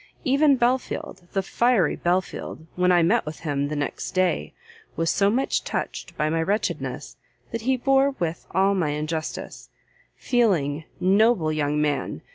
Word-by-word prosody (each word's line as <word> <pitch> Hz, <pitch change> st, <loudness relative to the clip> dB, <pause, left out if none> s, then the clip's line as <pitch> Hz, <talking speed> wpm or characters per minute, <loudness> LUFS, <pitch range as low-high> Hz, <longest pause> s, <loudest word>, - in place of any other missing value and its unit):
even 280 Hz, +1 st, +4 dB
Belfield, 245 Hz, -7 st, -1 dB
the 195 Hz, -2 st, 0 dB
fiery 230 Hz, -4 st, +2 dB
Belfield, 175 Hz, -2 st, -2 dB
when 180 Hz, 0 st, +3 dB
I 175 Hz, -1 st, +5 dB
met 220 Hz, +8 st, +3 dB
with 155 Hz, 0 st, -8 dB
him 145 Hz, -3 st, -1 dB
the 150 Hz, -, -4 dB
next 145 Hz, +5 st, -4 dB
day, 185 Hz, -1 st, +1 dB, 0.4 s
was 165 Hz, 0 st, +1 dB
so 200 Hz, 0 st, +3 dB
much 255 Hz, +6 st, 0 dB
touched -, -, -4 dB
by 150 Hz, -, +1 dB
my 165 Hz, +1 st, 0 dB
wretchedness, 200 Hz, +6 st, -2 dB, 0.3 s
that 230 Hz, -, -3 dB
he 260 Hz, +3 st, +1 dB
bore 270 Hz, +2 st, +3 dB
with 170 Hz, -3 st, -3 dB
all 195 Hz, +3 st, +2 dB
my 180 Hz, -6 st, 0 dB
injustice; 155 Hz, +2 st, -4 dB, 0.5 s
feeling, 160 Hz, -, +1 dB
noble 195 Hz, -3 st, +3 dB
young 150 Hz, -1 st, 0 dB
man! 150 Hz, -2 st, -1 dB
180 Hz, 150 wpm, -24 LUFS, 155-230 Hz, 0.5 s, I